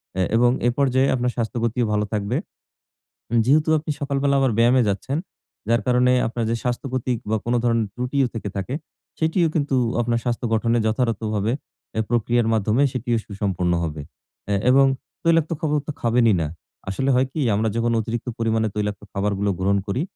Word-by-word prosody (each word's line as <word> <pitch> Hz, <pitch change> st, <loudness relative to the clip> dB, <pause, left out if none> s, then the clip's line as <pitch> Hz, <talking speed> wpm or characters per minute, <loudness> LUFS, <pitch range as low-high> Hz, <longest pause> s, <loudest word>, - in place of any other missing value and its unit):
অ্যা 95 Hz, -, +1 dB
এবং 120 Hz, +1 st, +5 dB, 0.2 s
এপর্যায়ে 130 Hz, +1 st, +2 dB
আপনার 125 Hz, -1 st, 0 dB
স্বাস্থ্যগতিও 115 Hz, 0 st, -1 dB
ভালো 105 Hz, 0 st, +1 dB
থাকবে। 105 Hz, +3 st, -1 dB, 0.9 s
উম 115 Hz, -, +2 dB
যেহেতু 150 Hz, +4 st, +3 dB
আপনি 155 Hz, 0 st, -4 dB
সকালবেলা 140 Hz, 0 st, 0 dB
আবার 135 Hz, -2 st, +2 dB
ব্যায়ামে 120 Hz, +2 st, +5 dB
যাচ্ছেন, 130 Hz, +9 st, -2 dB, 0.5 s
যার 115 Hz, 0 st, +3 dB
কারণে 125 Hz, 0 st, +4 dB, 0.2 s
আপনার 115 Hz, 0 st, -3 dB
যে 115 Hz, -, +1 dB
স্বাস্থ্যক্ষতিক 125 Hz, 0 st, -2 dB
বা 110 Hz, -, +2 dB
কোনো 120 Hz, +1 st, +1 dB
ধরণের 115 Hz, -3 st, +2 dB
ত্রুটিও 125 Hz, +2 st, 0 dB
থেকে 105 Hz, -3 st, -4 dB
থাকে? 100 Hz, +7 st, -3 dB, 0.5 s
সেটিও 165 Hz, +1 st, +2 dB
কিন্তু 145 Hz, -3 st, +1 dB, 0.3 s
আপনার 120 Hz, 0 st, 0 dB
স্বাস্থ্য 120 Hz, -1 st, -2 dB
গঠনে 115 Hz, +1 st, +2 dB
যথারথভাবে 110 Hz, -2 st, 0 dB, 0.4 s
অ্যা 110 Hz, -, 0 dB
প্রক্রিয়ার 120 Hz, 0 st, +2 dB
মাধ্যমে 110 Hz, +5 st, +2 dB
সেটিও 120 Hz, -2 st, -1 dB
সুসম্পন্ন 95 Hz, -4 st, -1 dB
হবে। 75 Hz, -2 st, -4 dB, 0.5 s
অ্যা 100 Hz, -, +1 dB
এবং 135 Hz, +1 st, +6 dB, 0.4 s
তৈলাক্ত 165 Hz, -1 st, +3 dB
খাবার 150 Hz, -2 st, 0 dB
তো -, -, -1 dB
খাবেনই 115 Hz, -2 st, +3 dB
না। 80 Hz, -, -1 dB, 0.4 s
আসলে 130 Hz, +8 st, -1 dB
হয় 130 Hz, +1 st, +3 dB
কি? 155 Hz, -, -3 dB
আমরা 110 Hz, +2 st, +1 dB
যখন 115 Hz, 0 st, +1 dB
অতিরিক্ত 115 Hz, +3 st, -4 dB
পরিমাণে 110 Hz, -1 st, +1 dB
তৈলাক্ত 105 Hz, -1 st, -2 dB
খাবারগুলো 100 Hz, 0 st, -1 dB
গ্রহণ 100 Hz, +2 st, +2 dB
করি, 100 Hz, +7 st, -1 dB
120 Hz, 165 wpm, -22 LUFS, 110-130 Hz, 0.9 s, এবং